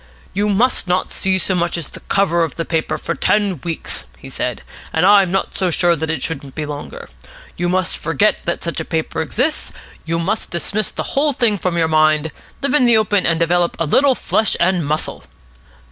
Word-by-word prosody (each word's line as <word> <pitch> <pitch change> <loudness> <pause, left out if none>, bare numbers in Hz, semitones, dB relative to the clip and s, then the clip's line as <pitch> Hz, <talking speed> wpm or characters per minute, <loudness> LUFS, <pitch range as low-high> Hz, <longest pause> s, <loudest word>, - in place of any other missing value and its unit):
"You 205 +2 0
must 215 0 +2
not 180 +1 0
see 190 0 +1
so 190 +1 +1
much 175 -1 0
as 165 - -4
the - - -10
cover 170 -4 +1
of 165 - -3
the 165 - -3
paper 160 -2 -1
for - - -3
ten 200 -8 0
weeks," 165 -2 -4
he - - -12
said. - - -3 0.3
"And 160 +3 +2
I'm 200 -2 +5
not 195 - -1
so 185 -2 +1
sure 175 0 +3
that 160 0 -3
it 160 - -1
shouldn't 140 -4 -3
be 155 - -3
longer. 150 - -7 0.5
You 175 0 -1
must 185 0 0
forget 165 +6 +1
that 170 - -2
such 170 - -3
a - - -2
paper 160 0 -2
exists. 255 - 0 0.3
You 165 0 -2
must 190 +6 -1
dismiss 195 +5 0
the - - -4
whole 290 +1 +2
thing 225 -5 +1
from 175 -1 -1
your 165 -1 +2
mind, 155 0 +2 0.3
live 280 - +1
in 255 -5 +4
the 235 -2 +6
open, 205 -2 +2
and 165 -1 +1
develop 170 +1 +1
a 165 - -1
little 265 - +3
flesh 220 -2 +1
and 180 -1 +2
muscle." 150 +2 -3
175 Hz, 205 wpm, -18 LUFS, 160-205 Hz, 0.5 s, the